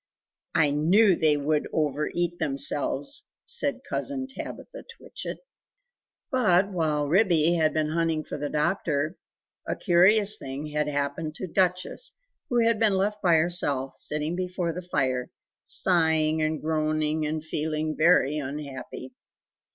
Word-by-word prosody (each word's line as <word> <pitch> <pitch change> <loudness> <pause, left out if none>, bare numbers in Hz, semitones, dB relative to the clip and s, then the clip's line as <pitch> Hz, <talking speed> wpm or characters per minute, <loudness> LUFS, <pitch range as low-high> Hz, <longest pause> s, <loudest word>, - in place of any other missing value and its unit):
"I 145 - +4
KNEW 180 +7 +4
they 155 -2 +3
would 150 +1 0
over 150 -1 0
eat 175 0 -2
themselves!" 145 - 0 0.2
said - - -1
Cousin 270 -2 -3
Tabitha 385 - -9
Twitchit. - - -8 0.9
But 200 -7 +3
while 155 -5 0
Ribby 170 -2 +4
had 160 -2 +2
been 155 -1 0
hunting 165 -1 0
for - - -7
the 145 0 -3
doctor 155 0 -1 0.5
a - - -1
curious 205 +3 +4
thing 135 +2 -6
had 150 0 0
happened 145 +2 -2
to - - -5
Duchess, 185 - -1 0.4
who 240 -2 +2
had 230 -2 +2
been 215 -3 +3
left 205 +2 -1
by 175 -3 +4
herself, 145 -5 0
sitting 150 +3 -2
before 180 -2 -2
the 180 - -5
fire, 130 -8 -1 0.3
sighing 160 -3 +2
and 155 0 0
groaning 155 0 0
and 155 0 -3
feeling 155 0 -2
very 155 -3 +3
unhappy. 135 -2 -7
160 Hz, 135 wpm, -26 LUFS, 150-180 Hz, 0.9 s, I